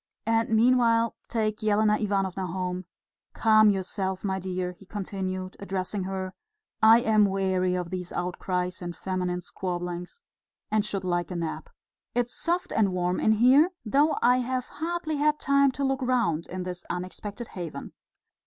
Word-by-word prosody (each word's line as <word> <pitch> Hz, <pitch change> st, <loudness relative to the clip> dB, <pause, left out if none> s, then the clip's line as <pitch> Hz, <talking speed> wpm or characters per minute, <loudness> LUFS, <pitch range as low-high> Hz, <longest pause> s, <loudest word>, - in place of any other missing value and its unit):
And 225 Hz, +1 st, +2 dB
meanwhile 230 Hz, 0 st, +3 dB
take 215 Hz, -2 st, -1 dB
Elena 210 Hz, 0 st, +3 dB
Ivanovna 195 Hz, -3 st, -1 dB
home.... 180 Hz, 0 st, -3 dB, 0.5 s
Calm 215 Hz, -1 st, +5 dB
yourself, 190 Hz, -1 st, -2 dB
my 190 Hz, -1 st, -1 dB
dear," 185 Hz, -1 st, -3 dB
he 180 Hz, -, -16 dB
continued, 190 Hz, -2 st, -4 dB
addressing 195 Hz, 0 st, -3 dB
her. 190 Hz, -1 st, -4 dB, 0.5 s
"I 225 Hz, +2 st, +7 dB
am 215 Hz, -2 st, +4 dB
weary 190 Hz, -2 st, +1 dB
of 180 Hz, -2 st, -3 dB
these 180 Hz, -1 st, -4 dB
outcries 180 Hz, 0 st, -2 dB
and 175 Hz, -1 st, -5 dB
feminine 180 Hz, 0 st, -2 dB
squabblings, 175 Hz, -, -5 dB, 0.5 s
and 215 Hz, -1 st, +3 dB
should 195 Hz, -2 st, -3 dB
like 175 Hz, -1 st, -1 dB
a 180 Hz, -, -5 dB
nap. 170 Hz, -, -4 dB, 0.5 s
It's 245 Hz, 0 st, 0 dB
soft 355 Hz, +1 st, -1 dB
and 210 Hz, -3 st, +2 dB
warm 180 Hz, 0 st, 0 dB
in 220 Hz, -, +4 dB
here, 260 Hz, +9 st, +6 dB, 0.2 s
though 285 Hz, +8 st, +3 dB
I 250 Hz, +1 st, +5 dB
have 255 Hz, 0 st, -2 dB
hardly 320 Hz, 0 st, -3 dB
had 300 Hz, +1 st, +2 dB
time 280 Hz, 0 st, +4 dB
to 280 Hz, -, -3 dB
look 270 Hz, 0 st, 0 dB
round 235 Hz, -11 st, +1 dB
in 185 Hz, 0 st, -5 dB
this 180 Hz, -1 st, -6 dB
unexpected 200 Hz, +5 st, -5 dB
haven." 175 Hz, -4 st, -7 dB
195 Hz, 155 wpm, -27 LUFS, 180-230 Hz, 0.5 s, I